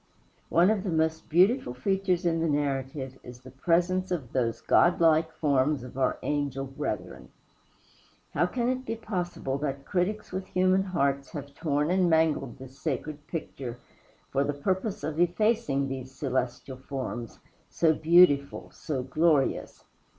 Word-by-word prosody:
One 175 +5 +5
of 205 -3 0
the 195 - -2
most 160 -1 0
beautiful 185 - +3
features 190 +4 0
in 165 -1 +2
the 165 0 +1
narrative 135 -2 -2
is 125 0 -11
the 130 0 -12
presence 175 +6 +1
of 150 -10 -4
those 120 -3 0
godlike 165 -2 +4
forms 145 -3 +1
of 125 - -10
our 130 -1 +1
angel 140 -2 -1
brethren. 130 -9 -5 1.0
How 175 - +2
can 240 +5 -1
it 255 +1 -1
be 230 - -3
possible 175 -10 -3
that 140 -1 -3
critics 205 +3 -1
with 190 +1 -4
human 185 +1 +3
hearts 140 -7 0
have 145 -2 -7
torn 150 0 0
and 185 -1 +3
mangled 160 -6 +1
this 130 +1 -12
sacred 150 0 -4
picture 130 -7 -5 0.5
for 140 +1 +2
the 145 - -1
purpose 190 +8 -2
of 155 +1 -3
effacing 175 -5 +2
these 130 -1 -5
celestial 130 -1 -3
forms 130 -4 -5 0.3
so 160 -2 +3
beautiful, 155 -3 +4
so 135 -5 -3
glorious! 150 +1 +1
150 Hz, 145 wpm, -28 LUFS, 135-180 Hz, 1.0 s, One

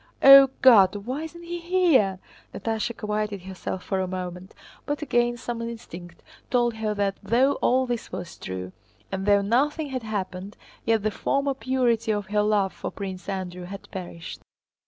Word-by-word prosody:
O 275 0 +10
God, 205 -7 +7
why 260 +5 -3
isn't 340 +2 -10
he 345 0 -5
here?" 335 - +3 0.4
Natásha 225 0 -2
quieted 210 -2 -3
herself 190 0 -6
for 190 - -2
a 185 - -1
moment, 180 0 -6 0.3
but 290 +1 -2
again 240 -3 +1
some 235 0 -5
instinct 180 -7 -8 0.3
told 240 -1 +2
her 220 -1 -2
that 200 -1 -1
though 245 +7 +3
all 260 +1 +3
this 240 -2 -4
was 175 -1 -6
true, 95 0 -6 0.4
and 190 +1 -3
though 200 -1 +4
nothing 285 +8 +1
had 260 -1 -3
happened, 200 -3 -5 0.3
yet 225 -2 +2
the 215 - +1
former 275 +6 0
purity 245 -4 0
of 205 -1 -1
her 210 0 +3
love 210 -3 +1
for - - -5
Prince 190 -1 -7
Andrew 180 -2 -4
had 195 +2 -9
perished. 175 -3 -7
215 Hz, 165 wpm, -25 LUFS, 190-255 Hz, 0.4 s, O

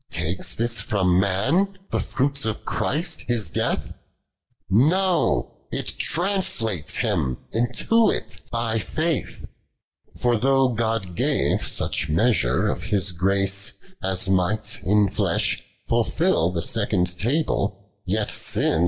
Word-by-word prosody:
Takes 85 +3 -2
this 115 0 +1
from 95 -4 +2
man 135 - +1
the - - 0
fruits 140 +1 -1
of 110 -2 -3
Christ 160 +2 -1
His 110 -8 0
death? - - -1 0.7
No, 170 - +2
it - - -1
tnmslatcs 165 - 0
him 65 -2 0
into 125 - +2
it - - -3
by 115 -1 0
faith. 155 +6 -2 0.7
73. - - -14
For 120 -1 +2
though 135 +2 +3
(iod 110 -5 -1
gave - - +1
sucli - - -1
measure 85 - +2
of - - -2
His 100 -2 +1
grace 100 +2 0 0.3
As 95 0 0
might 95 +3 +1
in 105 +1 +3
flesh - - 0 0.3
fulfil 80 - +2
the 85 -2 -3
second 90 -5 0
table, 100 -6 0
» 100 -2 -16
I)a»via. 105 -5 0
105 Hz, 120 wpm, -23 LUFS, 95-130 Hz, 0.7 s, though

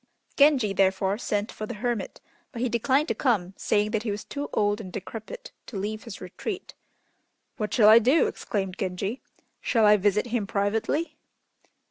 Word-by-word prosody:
Genji, 280 -8 +4
therefore, 195 +1 +1
sent 210 -2 -2
for 215 - -6
the - - -5
hermit, 225 -2 -3 0.3
but 235 - -7
he 250 - +1
declined 260 +6 +2
to - - +2
come, 200 -8 0
saying 210 +1 +1
that 220 -2 0
he 225 - -3
was 205 +1 -3
too 285 0 -5
old 205 +1 +1
and 185 -4 -9
decrepit 225 - -8 0.2
to 210 - -6
leave 215 +4 -4
his 230 -5 -8
retreat. 365 - -6 0.8
"What 210 -3 -3
shall 215 -4 +5
I 220 +2 +9
do?" 260 +8 +4
exclaimed 195 -3 -3
Genji, 195 +6 -3 0.4
"shall 225 -3 +2
I 210 0 +7
visit 205 +2 +2
him 220 -5 0
privately?" 225 +11 -1
215 Hz, 170 wpm, -26 LUFS, 200-240 Hz, 0.8 s, I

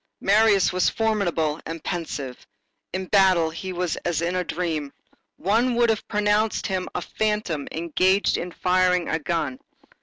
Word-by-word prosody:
Marius 205 -1 +4
was 185 - +3
formidable 175 -9 0
and 165 0 -7
pensive. 145 -7 -5 0.4
In 185 +1 -3
battle 185 -4 +4
he 185 +3 -6
was 180 -2 -2
as 170 -2 -2
in 175 +2 -1
a 180 - 0
dream. 160 -5 -3 0.5
One 230 +6 +1
would 235 -1 +4
have 220 - -3
pronounced 210 +1 +1
him 185 -2 -2
a - - -2
phantom 210 -9 -2
engaged 185 +4 +1
in 180 - -4
firing 180 0 +2
a 160 - 0
gun. 150 -5 -2
180 Hz, 150 wpm, -24 LUFS, 165-205 Hz, 0.5 s, Marius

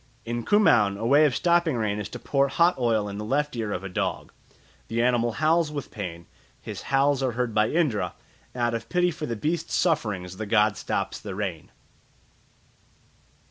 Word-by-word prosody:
In 120 0 -3
Kumaon 120 - +4
a 115 - -4
way 145 +5 +5
of 135 -5 +1
stopping 170 -4 +2
rain 105 -2 -1
is 105 - -5
to - - -7
pour 140 -1 +1
hot 170 +5 +3
oil 115 -4 +1
in 100 0 -6
the - - -4
left 145 +5 -1
ear 110 -3 -3
of 95 - -3
a - - -4
dog. 90 - -3 0.6
The 115 - -2
animal 120 -1 +2
howls 160 +2 +2
with 145 -2 -6
pain, 85 -5 -6 0.3
his - - -7
howls 140 0 +3
are 130 -2 0
heard 120 -1 -2
by 110 +1 +2
Indra, 150 -11 0 0.4
and 125 - -3
out 120 0 +1
of 115 -1 -4
pity 180 0 +2
for 155 -1 -5
the 115 - -2
beast's 160 +8 -2
sufferings 105 - 0
the 110 - -5
god 105 0 +3
stops - - -3
the 100 -3 -7
rain. 95 -6 -4
120 Hz, 190 wpm, -25 LUFS, 105-150 Hz, 0.6 s, way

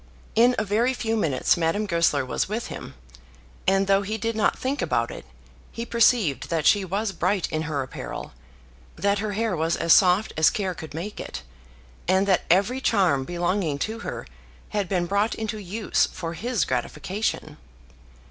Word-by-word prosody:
In 240 +3 +5
a - - +1
very 225 +5 +1
few 225 -2 -1
minutes 150 - +2
Madame 170 +6 0
Goesler 170 -7 +2
was 130 - -2
with 225 +3 -3
him, - - -8 0.7
and, 195 +1 +3
though 195 0 +3
he 215 +2 -3
did 225 +1 -2
not 215 - +2
think 270 +3 -2
about - - 0
it, - - -9 0.5
he 230 - -5
perceived 225 - +2
that 160 -3 -1
she 205 -2 +5
was 200 +3 -2
bright 185 +1 0
in 155 - -1
her 140 -3 -1
apparel, 130 - -7 0.6
that 200 +1 +1
her 210 0 -2
hair 220 -1 0
was 165 +1 0
as 165 - +4
soft 190 +2 +4
as 155 -1 +5
care 190 -3 -2
could 160 -3 -9
make 190 +6 -5
it, - - -6 0.6
and 190 +2 +3
that 190 -2 +2
every 200 +9 +3
charm 180 - +2
belonging 175 -2 -1
to 220 +10 -3
her - - -5 0.4
had 205 -4 -2
been 180 -3 +1
brought 200 +5 +1
into 220 -1 -4
use 205 +3 0
for 165 -2 -6
his 235 +5 -1
gratification. 155 - -3
195 Hz, 175 wpm, -25 LUFS, 170-220 Hz, 0.7 s, In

